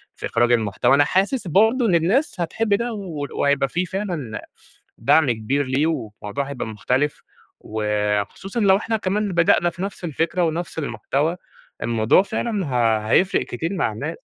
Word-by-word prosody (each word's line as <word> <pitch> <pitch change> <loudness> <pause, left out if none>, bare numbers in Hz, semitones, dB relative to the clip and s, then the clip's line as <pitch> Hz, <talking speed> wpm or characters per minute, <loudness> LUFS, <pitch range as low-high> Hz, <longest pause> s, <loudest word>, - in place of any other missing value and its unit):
في - - -6
إخراج 120 +1 +2
المحتوى. 120 +3 +3
أنا 145 - +5
حاسس 195 +3 0
برضه 220 - +3
إن 180 -5 +3
الناس 195 - +1
هتحب 205 +5 0
ده، 235 +3 0
ول 165 -9 -5
وهيبقى 140 -1 +1
في 180 +2 -1
فعلًا 170 - -4 0.6
دعم 150 -6 +4
كبير 115 +6 -1
ليه 135 +5 +1
وموضوع 115 -3 -4
هيبقى 130 -5 -4
مختلف 130 +7 -1 0.4
وخصوصًا 105 - -2
لو 195 -2 +5
إحنا 225 +1 -1
كمان 205 0 -1
بدأنا 170 +1 +3
في 170 +2 -10
نفس 195 -1 -5
الفكرة 170 +2 -1
ونفس 165 0 -2
المحتوى، 140 - -1 0.5
الموضوع 115 +8 +3
فعلًا 205 -1 -2
ه 115 -4 +2
هيفرق 190 +9 +3
كتير 165 +10 -4
مع 165 - 0
الناس. 110 - -6
160 Hz, 155 wpm, -22 LUFS, 120-195 Hz, 0.6 s, أنا